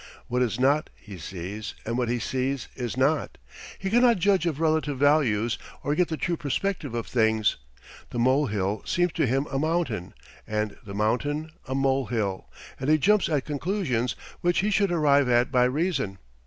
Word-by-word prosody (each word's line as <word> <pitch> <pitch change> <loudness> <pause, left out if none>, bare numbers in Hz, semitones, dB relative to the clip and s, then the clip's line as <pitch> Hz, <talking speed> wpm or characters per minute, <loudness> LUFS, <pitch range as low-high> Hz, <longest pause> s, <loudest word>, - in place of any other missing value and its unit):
What 125 +1 0
is 120 -1 0
not, 145 +4 +2
he 100 -4 -11
sees, 95 +5 -6
and 115 - -2
what 125 -1 0
he 120 - +1
sees, 130 +3 -2
is 125 -1 -4
not. 145 +4 +1 0.4
He 190 0 -3
cannot 240 0 +5
judge 185 -2 +2
of 155 -3 -2
relative 155 -3 +1
values 125 -6 +2 0.2
or 145 - 0
get 175 +3 +2
the 160 - -3
true 175 +2 -1
perspective 150 -2 -2
of 115 - -2
things. 110 -3 +2 0.5
The - - -6
molehill 110 -6 +1
seems 175 0 +1
to - - 0
him 135 +4 +1
a 135 - 0
mountain 155 - -1 0.3
and 105 0 -2
the 100 -1 -8
mountain 145 +9 0 0.2
a 130 - -2
molehill, 125 -8 0 0.3
and 130 - -2
he 155 - +6
jumps 205 +6 +3
at 145 -4 0
conclusions 145 - -1 0.2
which 175 +1 +2
he 210 +2 0
should 200 -2 +2
arrive 145 -5 +3
at 120 +1 +3
by 125 -2 +4
reason. 135 - -1
135 Hz, 175 wpm, -26 LUFS, 115-160 Hz, 0.5 s, he